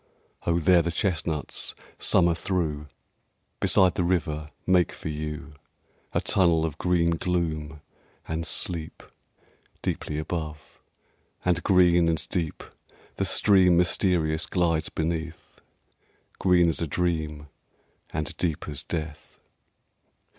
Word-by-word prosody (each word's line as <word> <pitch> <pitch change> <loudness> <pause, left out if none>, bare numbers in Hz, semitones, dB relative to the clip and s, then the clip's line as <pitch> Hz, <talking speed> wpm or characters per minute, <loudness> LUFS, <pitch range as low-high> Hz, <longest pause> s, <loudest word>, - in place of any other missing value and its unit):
Oh! 85 0 +3
there 85 +1 +5
the 85 - -2
chestnuts, 85 -4 -2 0.2
summer 85 -2 +3
through, 80 -4 -2 0.7
Beside 95 -2 +4
the 90 - 0
river 80 -4 -1 0.2
make 90 -2 +3
for - - -6
you 75 0 -5 0.6
A - - +1
tunnel 85 -4 +3
of 80 -1 -5
green 85 -2 +2
gloom, 80 -3 -2 0.5
and 80 +1 -2
sleep 85 -3 -3 0.8
Deeply 75 - -3
above; 75 -1 -5 0.7
and 90 -1 +2
green 90 -2 +4
and 80 0 -1
deep 80 -4 -2 0.5
The - - 0
stream 95 -4 +5
mysterious 85 -3 +2
glides 85 -3 0
beneath, 80 0 -4 0.8
Green 90 -2 +4
as 80 - 0
a 85 - -1
dream 75 -2 -2 0.6
and 75 0 -3
deep 80 -4 -2
as 75 -2 -5
death. 80 -2 -6
85 Hz, 110 wpm, -26 LUFS, 80-90 Hz, 0.8 s, there